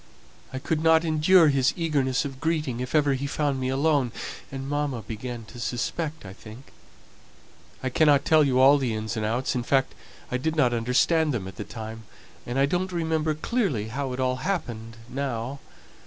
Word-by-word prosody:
I 130 - -5
couldn't 160 +3 +2
endure 160 +1 +5
his 135 -2 +2
eagerness 140 -6 0
of 135 -2 -6
greeting 155 -6 -1
if 125 +4 -3
ever 145 -2 +4
he 135 +1 -2
found 145 -1 -1
me 130 0 -1
alone; 140 -2 +2 0.4
and 135 0 -5
mamma 145 -5 -2
began 115 +2 -6
to 120 - -12
suspect, 150 +5 -3
I 95 - -8
think. 110 +6 -13 1.1
I 130 - 0
cannot 145 +1 +4
tell 155 -1 +5
you 130 -3 +2
all 140 +2 +7
the 125 -5 -1
ins 110 +1 -3
and 110 - -2
outs; 120 +6 0
in 125 - -1
fact, 135 +2 +1 0.4
I 125 - +1
didn't 160 +4 -1
understand 135 +6 +2
them 95 -5 -4
at 95 - -10
the - - -4
time, 110 +1 -8 0.4
and 120 +2 -3
I 135 - +4
don't 180 +5 -1
remember 160 -2 0
clearly 155 - -1
how 135 +3 -3
it 125 - -5
all 130 0 +1
happened 120 - -4
now. 130 0 -3
135 Hz, 180 wpm, -26 LUFS, 120-155 Hz, 1.1 s, all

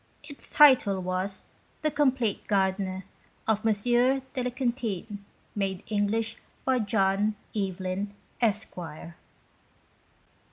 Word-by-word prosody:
Its 285 -2 -5
title 255 -10 +6
was 185 +1 -2 0.4
"The 305 - +2
Compleat 260 -8 +1
Gard'ner 190 -1 0 0.2
" - - -31
of 215 -1 +2
M. 225 - +4
de 245 +2 +4 0.2
la 250 - 0
Quintinye 235 -5 -2 0.3
made 195 -1 -2
English 220 +2 0 0.3
by 260 -1 +3
John 205 0 +2 0.2
Evelyn 190 0 -2 0.3
Esquire. 180 -7 -2
205 Hz, 105 wpm, -28 LUFS, 190-240 Hz, 0.4 s, title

